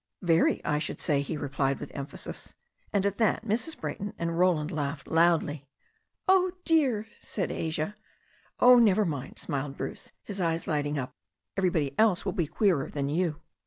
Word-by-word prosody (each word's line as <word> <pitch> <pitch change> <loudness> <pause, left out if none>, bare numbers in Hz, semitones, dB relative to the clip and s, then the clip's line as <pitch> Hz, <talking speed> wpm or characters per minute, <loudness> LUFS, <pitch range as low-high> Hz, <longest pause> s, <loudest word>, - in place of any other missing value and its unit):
"Very, 165 -1 +3
I 150 0 +1
should 150 - -4
say," 140 -2 +1
he 140 +2 -3
replied 135 -1 -1
with - - -7
emphasis. 140 0 -7 0.4
And 200 -1 +1
at 200 +1 -1
that 220 0 +2
Mrs. 235 +9 -1
Brayton 205 +2 -4
and 170 0 -2
Roland 170 -4 +2
laughed 145 -1 -3
loudly. 160 -4 +2 0.6
"Oh, 370 -1 +4
dear," 265 -10 +2
said 195 - -3
Asia. 160 +4 -2 0.6
"Oh, 250 0 +8
never 215 -2 +4
mind," 140 -6 -4
smiled 140 -2 -3
Bruce, - - -6
his 200 -2 -5
eyes 165 -1 0
lighting 145 -1 -1
up. 130 -2 -4 0.4
"Everybody 170 -8 +1
else 215 -5 +4
will 190 - -1
be 170 -3 0
queerer 175 -6 +1
than 140 -1 -2
you." 160 -1 0
165 Hz, 160 wpm, -28 LUFS, 145-205 Hz, 0.6 s, Oh